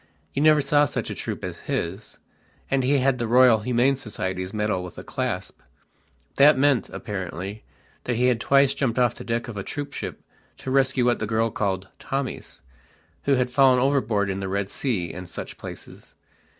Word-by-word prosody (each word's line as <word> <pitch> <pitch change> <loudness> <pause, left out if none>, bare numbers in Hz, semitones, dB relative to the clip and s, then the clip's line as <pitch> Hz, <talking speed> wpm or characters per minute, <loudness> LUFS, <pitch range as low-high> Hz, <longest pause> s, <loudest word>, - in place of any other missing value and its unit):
You 140 - -1
never 155 -1 +6
saw 145 +1 +3
such - - -3
a - - -2
troop - - -5
as - - -5
his. 95 +6 -3 0.5
And 135 -1 +2
he 140 +3 +3
had 130 -1 +2
the 120 - -1
Royal 125 -1 +6
Humane 125 +4 +2
Society's 95 -7 -4
medal 105 -4 -1
with 90 - -9
a - - -7
clasp. - - -4 0.8
That 145 0 +7
meant, 135 -2 +3
apparently, 100 -1 -6 0.4
that 125 - 0
he 125 +2 +2
had 125 -3 +2
twice 140 -1 +4
jumped 120 -4 -1
off 120 -2 +3
the - - -10
deck 115 0 -2
of 115 -4 -7
a 100 - -3
troopship 145 +3 -6 0.3
to 130 - -5
rescue 130 -2 +2
what 120 -1 +2
the 110 - -2
girl 110 +1 +1
called 95 -2 -2
"Tommies", 135 -1 -4 0.6
who 140 - +4
had 125 -1 0
fallen 130 0 +5
overboard 125 -7 +1
in 95 - -3
the 95 -1 -3
Red 100 0 -2
Sea 100 -11 -2
and 90 0 -8
such - - -8
places. - - -10
120 Hz, 185 wpm, -24 LUFS, 100-135 Hz, 0.8 s, That